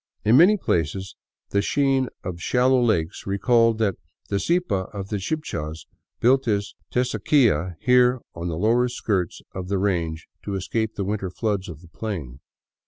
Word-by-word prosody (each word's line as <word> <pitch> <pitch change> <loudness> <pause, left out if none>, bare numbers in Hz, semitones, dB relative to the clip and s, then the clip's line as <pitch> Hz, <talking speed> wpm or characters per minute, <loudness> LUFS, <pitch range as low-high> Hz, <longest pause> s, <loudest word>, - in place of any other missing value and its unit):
In 110 +3 +5
many 180 +9 +7
places 95 - -1 0.4
the 100 - +2
sheen 135 +2 +1
of 85 -2 -5
shallow 125 +3 +3
lakes 100 -10 0
recalled 115 +3 +3
that 105 -5 0 0.3
the 100 - 0
Zipa 110 - 0
of 100 -2 -6
the 105 - -1
Chibchas 85 - -4 0.3
built 130 +3 +4
his 105 -3 -1 0.2
Teusaquilla 110 - +2
here 125 0 +4
on 85 +1 -5
the 80 -2 -3
lower 115 +6 +3
skirts 100 -7 -2
of 95 -1 -5
the 100 +1 0
range 85 -5 -1
to 100 - -4
escape 110 +3 -2
the 100 - -2
winter 100 -1 -2
floods 100 0 -2
of 80 -2 -9
the 85 - -15
plain. 80 - -6
100 Hz, 160 wpm, -24 LUFS, 90-125 Hz, 0.4 s, many